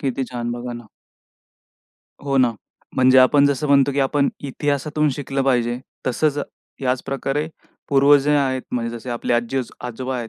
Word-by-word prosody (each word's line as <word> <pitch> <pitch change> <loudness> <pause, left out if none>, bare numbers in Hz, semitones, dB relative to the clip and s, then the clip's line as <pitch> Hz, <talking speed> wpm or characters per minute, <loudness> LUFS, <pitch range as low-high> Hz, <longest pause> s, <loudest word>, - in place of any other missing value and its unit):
किती 135 -1 -1
छान 120 -1 -3
बघा 120 0 -5
ना. 120 -1 -9 1.4
हो 135 -1 0
ना. 125 -2 +4 0.4
म्हणजे 130 0 +6
आपण 140 +3 +5
जसं 140 +1 0
म्हणतो, 140 -1 +4
की 140 - 0
आपण 140 +1 +2 0.2
इतिहासातून 145 +2 -1
शिकलं 135 -1 -2
पाहिजे 120 -2 +1 0.3
तसंच 145 +4 +1 0.4
याचप्रकारे 135 +3 -1 0.4
पूर्वज 140 0 +5
ही 150 - +4
आहेत 130 -2 +1
म्हणजे 120 -1 -2
जसे 120 +2 -8
आपले 120 0 -2
आज्जी-आजोबा 125 +1 -3
आहेत. 120 -2 -5
130 Hz, 145 wpm, -21 LUFS, 125-140 Hz, 1.4 s, म्हणजे